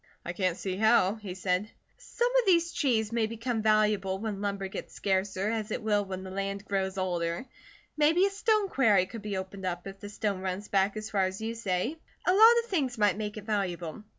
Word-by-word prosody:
"I 175 - -3
can't 185 -1 0
see 185 -1 -3
how," 220 -2 +4
he 210 -5 -7
said. 185 +2 -1 0.3
"Some 485 +1 -1
of 475 - -1
the 355 -3 +6
trees 225 -6 +1
may 230 -2 +1
become 230 +1 -3
valuable 210 -3 +2
when 205 -1 -4
lumber 200 -1 -2
gets 190 - -8
scarcer, 195 +1 0
as 220 -2 -2
it - - -3
will 210 -1 +2
when 190 -1 -6
the 190 - -8
land 195 +1 -3
grows 190 -1 -1
older. 175 +1 -1 0.5
Maybe 315 +5 +4
a 400 - 0
stone 425 0 +2
quarry 215 - +3
could 225 +3 -8
be 205 -2 -3
opened 190 0 -5
up, 175 -1 -4
if 195 0 -8
the 205 - -8
stone 205 -2 -2
runs 190 +2 -4
back 200 +1 +2
as 215 0 -6
far 195 -2 +2
as 185 +1 -4
you 225 +1 -3
say. 225 - -2 0.3
A 365 - +4
lot 450 +4 +8
of 470 - -16
things 270 -9 0
might 205 -3 +3
make 210 0 -4
it 215 - -7
valuable. 185 -4 -2
205 Hz, 215 wpm, -29 LUFS, 190-225 Hz, 0.5 s, lot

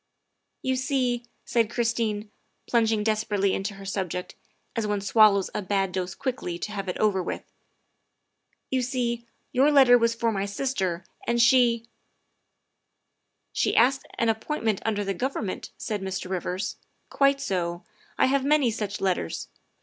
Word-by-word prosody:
" - - -52
You 260 0 +1
see," 255 -3 0 0.2
said 230 -3 +2
Christine, 225 -3 -1 0.3
plunging 225 -3 +2
desperately 210 -2 +1
into 195 +1 -3
her 195 0 -10
subject, 185 -2 -3 0.4
as 225 -3 -1
one 205 -1 0
swallows 200 -1 +4
a - - -2
bad 195 -1 0
dose 185 0 -3
quickly 245 -10 -3
to 210 - -5
have 195 -2 -4
it 180 - -3
over 205 -3 +2
with, - - -4 0.7
" - - -48
you 260 -1 +2
see, 240 -2 -2 0.2
your 275 +4 +4
letter 260 -4 +7
was 230 0 +2
for 230 0 +1
my 200 -1 -1
sister, 190 -6 -2 0.2
and 235 0 +1
she 235 -1 +5 0.6
" - - -52
" - - -52
She - - +1
asked 260 +3 +3
an 230 - +2
appointment 225 -2 -1
under 210 -2 0
the 195 - -1
Government," 220 -2 -3
said 210 -3 -3
Mr. 190 -1 -4
Rivers; 185 +1 -2 0.2
" - - -45
quite 275 0 +3
so. 175 -7 -2 0.3
I - - +5
have 275 0 +2
many 285 -4 +3
such 210 -2 -4
letters. 180 - -1
220 Hz, 160 wpm, -26 LUFS, 195-245 Hz, 0.7 s, letter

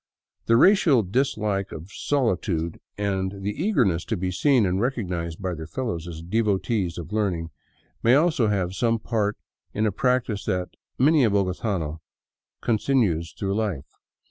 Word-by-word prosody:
The 115 - +5
racial 160 - +5
dislike 105 -3 -1
of 80 +5 -9
solitude 100 - -1 0.2
and 95 -1 -2
the 100 - 0
eagerness 105 - +1
to 110 - -2
be 90 +1 -2
seen 125 +4 +3
and 95 +1 0
recognized 90 -10 -2
by 95 -2 -2
their 80 -1 -7
fellows 110 - -4
as 80 -1 -7
devotees 100 -1 0
of 85 +4 -7
learning 90 -7 -1 0.5
may 120 +3 +5
also 150 -6 +3
have 95 -3 0
some 115 +3 +1
part 110 -2 -1 0.4
in 110 - +1
a 105 - +2
practice 125 -1 0
that 90 -3 -1 0.3
many 145 +2 +4
a 115 - +4
bogotano 95 -5 -1 0.6
continues 105 -8 +1
through 100 -1 -2
life. 100 -10 -3
100 Hz, 145 wpm, -25 LUFS, 90-115 Hz, 0.6 s, The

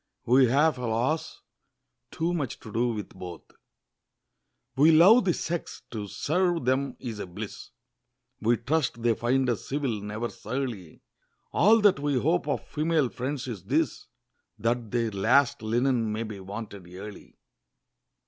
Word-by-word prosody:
We 130 +2 +5
have, 145 +3 +3
alas! 125 +6 -1 0.7
too 165 +2 -1
much 145 -8 -3
to 110 - -10
do 120 +2 +2
with 110 -3 -3
both! 90 -3 -9 1.3
We 150 +5 +6
love 190 +10 +7
the 180 - +3
sex: 170 -6 -4
to 105 -3 -5
serve 175 - 0
them 135 +2 0
is 115 -4 -6
a 100 - -5
bliss! 85 - -8 0.7
We 115 +2 +3
trust 130 -2 -1
they 120 -1 +4
find 125 +4 +1
us 120 -4 -2
civil, 135 -7 -1
never 105 +3 -4
surly; 115 -8 -5 0.5
All 220 +4 +5
that 205 -8 +5
we 145 -2 +1
hope 160 +4 +1
of 145 - -2
female 155 -3 +1
friends 130 +3 -4
is 110 -7 -6
this, - - 0 0.5
That 115 +1 -1
their 115 -1 0
last 120 +7 +3
linen 115 0 +1
may 110 +2 -2
be 110 -3 -7
wanted 100 -1 -8
early. 100 +2 -10
125 Hz, 145 wpm, -27 LUFS, 110-145 Hz, 1.3 s, love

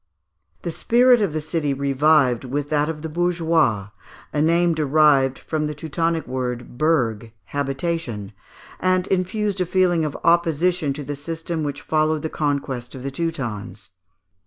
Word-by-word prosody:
The 170 - -2
spirit 245 +6 +4
of 200 -6 +1
the 155 0 -2
city 150 -2 -1
revived 140 -2 +3
with 140 +3 -3
that 150 0 +2
of 155 -1 -5
the - - -2
bourgeois 165 - +1 0.4
(a 150 - +1
name 170 +2 +3
derived 150 -3 +3
from 155 -1 -2
the 150 - -5
Teutonic 165 +2 -1
word 125 -2 -4
burg, 115 -9 +1
habitation) 135 - -3 0.5
and 185 0 +2
infused 195 +1 -1
a - - +2
feeling 180 -2 +2
of 150 -2 -3
opposition 170 -1 +2
to 145 +1 -6
the 145 +1 -4
system 165 +3 -4
which 145 -1 -3
followed 155 -1 +1
the 160 - -2
conquest 140 -5 -2
of 130 - -8
the 140 - -3
Teutons. 110 - -4
155 Hz, 150 wpm, -22 LUFS, 135-170 Hz, 0.5 s, spirit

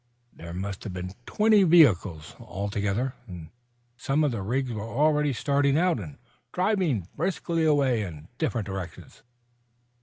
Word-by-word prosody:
There 85 0 -10
must 95 +2 -5
have 100 - -6
been 90 +1 -6
twenty 215 -1 +4
vehicles, 105 - +4
altogether, 100 +6 -2
and 85 -4 -9 0.5
some 140 +4 0
of 145 - +2
the 115 -4 -3
rigs 125 +6 -1
were 105 - -4
already 150 +6 +1
starting 140 +2 +1
out 175 -5 +2
and 80 -8 -8 0.3
driving 180 - 0
briskly 170 -1 -1
away 140 -6 +3
in 80 -6 -7
different 120 -10 -1
directions. 95 -4 -8
120 Hz, 140 wpm, -26 LUFS, 95-150 Hz, 0.5 s, twenty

